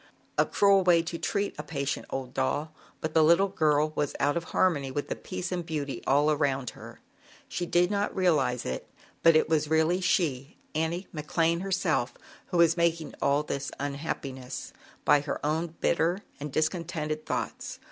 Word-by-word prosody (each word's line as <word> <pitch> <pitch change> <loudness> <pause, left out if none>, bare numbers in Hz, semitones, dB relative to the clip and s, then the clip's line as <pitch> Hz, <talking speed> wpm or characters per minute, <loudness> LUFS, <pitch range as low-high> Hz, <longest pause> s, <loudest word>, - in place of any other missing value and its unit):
A - - +3
cruel 200 -1 +4
way 170 -2 +5
to 170 0 -5
treat 200 0 -1
a - - -3
patient 140 -3 -3
old 130 -1 -4
doll, 145 +4 -1 0.3
but 160 - -3
the 160 - +5
little 170 +5 +5
girl 155 -4 +2
was 145 -1 -1
out 145 +1 +2
of 170 0 -2
harmony 145 -8 +1
with 145 +2 -3
the - - -1
peace 185 -1 -5
and 180 -1 -1
beauty 150 -4 -4
all 145 +3 +4
around 135 -4 0
her. - - -12 0.5
She 175 - -3
did 175 +3 +3
not 205 0 -1
realize 140 -10 +2
it, 65 - -4 0.3
but 165 -1 +6
it 155 - +4
was 155 -2 +1
really 160 +3 +2
she, 150 -8 0 0.2
Annie 160 +4 -1
McLane 165 +2 0
herself, 180 -10 0 0.3
who 180 - -2
was 170 -1 +5
making 170 -2 0
all 140 +1 +2
this 140 -2 -3
unhappiness 140 -3 -5 0.3
by 145 - +6
her 145 -1 -3
own 160 +2 -1
bitter 170 +4 +1 0.2
and 145 0 -5
discontented 155 0 -2
thoughts. - - -3
155 Hz, 170 wpm, -28 LUFS, 145-175 Hz, 0.5 s, but